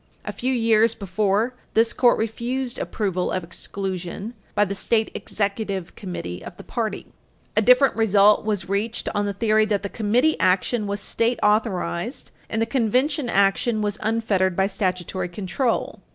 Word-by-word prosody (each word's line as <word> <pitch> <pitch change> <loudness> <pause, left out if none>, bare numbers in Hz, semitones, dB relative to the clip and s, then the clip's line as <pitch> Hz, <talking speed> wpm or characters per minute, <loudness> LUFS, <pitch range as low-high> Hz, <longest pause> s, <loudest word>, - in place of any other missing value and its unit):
A - - -3
few 255 +2 -2
years 230 -2 +3
before, 205 +4 0 0.2
this 225 +1 +3
Court 245 -2 +4
refused 240 +3 -3
approval 190 -4 -2
of 185 - -2
exclusion 190 +4 -5 0.2
by 205 - +4
the 200 - -3
State 220 +2 0
Executive 200 -3 -3
Committee 90 - -6
of - - -10
the - - -10
party. - - -3 0.5
A 215 - +4
different 250 +5 +5
result 210 -2 +4
was 205 -4 -2
reached 205 +4 -2
on 205 -1 0
the 200 - -2
theory 215 +1 +2
that 205 -2 -1
the 200 - -3
Committee 240 +10 +1
action 190 +5 +1
was 200 0 -3
state 230 +4 0
authorized, 210 +1 0 0.2
and 220 - -1
the 225 - +2
Convention 255 +3 +1
action 205 +3 +2
was 205 0 -2
unfettered 210 -5 +1
by 190 - +2
statutory 185 -2 -2
control. 210 +7 -2
210 Hz, 155 wpm, -23 LUFS, 195-230 Hz, 0.5 s, different